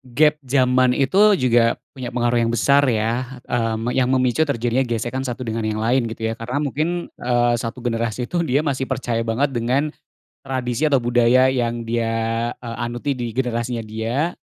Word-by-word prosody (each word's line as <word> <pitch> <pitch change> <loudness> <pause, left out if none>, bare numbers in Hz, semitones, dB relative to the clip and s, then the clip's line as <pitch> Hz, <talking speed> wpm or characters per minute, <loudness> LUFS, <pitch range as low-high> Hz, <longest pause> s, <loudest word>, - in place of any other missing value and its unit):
gep 150 +1 +4
zaman 130 -1 +3
itu 195 +10 +4
juga 120 -5 +3 0.2
punya 130 -3 -7
pengaruh 120 -1 +1
yang 115 - 0
besar 140 +4 +4
ya, 120 +3 -1
mmm, 115 0 -1
yang 125 0 +1
memicu 130 +4 +2
terjadinya 120 -1 0
gesekan 120 +3 -2
satu 125 +1 -4
dengan 115 -1 -3
yang 110 0 -2
lain 120 +1 +2
gitu 115 0 -7
ya? - - -2
Karena 125 +6 -2
mungkin, 160 +5 -2
eee, 120 -1 +2
satu 115 +1 -5
generasi 115 0 -2
itu, 175 - -1
dia 140 +3 +2
masih 135 -3 -1
percaya 115 -2 -2
banget 130 +5 +1
dengan 130 +5 0 0.5
tradisi 130 0 -2
atau 140 -3 +3
budaya 120 +1 +4
yang 120 -2 -1
dia, 115 0 -1
eee, 115 -2 -6
anuti 120 +4 -2
di 120 -2 -4
generasinya 120 -1 -2
dia, 115 +10 -2
120 Hz, 170 wpm, -21 LUFS, 115-130 Hz, 0.5 s, gep